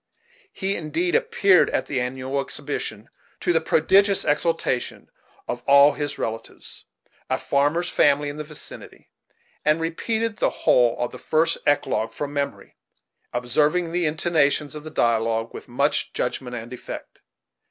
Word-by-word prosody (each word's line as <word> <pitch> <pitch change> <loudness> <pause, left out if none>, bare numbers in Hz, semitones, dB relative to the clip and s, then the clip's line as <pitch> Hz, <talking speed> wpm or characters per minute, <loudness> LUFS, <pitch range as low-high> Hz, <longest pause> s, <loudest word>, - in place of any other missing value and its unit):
He, 195 +1 -1
indeed, 335 - -1
appeared 465 -4 +4
at - - -1
the 130 -4 -1
annual 130 +2 -2
exhibition, - - -5 0.3
to 175 - +1
the 165 - +3
prodigious 195 +5 +3
exultation 150 -4 -1 0.4
of 120 - -4
all 140 +1 +7
his 145 0 -4
relatives, 115 0 -6 0.4
a - - +1
farmer's 145 +5 +1
family 145 -2 +3
in 145 +1 -5
the 155 - -4
vicinity, 150 0 -11 0.5
and 155 +2 +3
repeated 220 +7 -1
the - - +2 0.2
whole 120 -2 +4
of 120 - -2
the - - -10
first 165 +1 +1
eclogue 130 -5 +1
from 145 -1 -5
memory, 140 -1 -4 0.5
observing 150 +8 +1
the 175 -1 +1
intonations 150 -2 +1
of 150 -1 -8
the 155 - -7
dialogue 115 -4 0
with - - -9
much 140 +4 0
judgment 125 0 -3
and 120 +1 -7
effect. 125 - -9
145 Hz, 140 wpm, -23 LUFS, 130-165 Hz, 0.5 s, all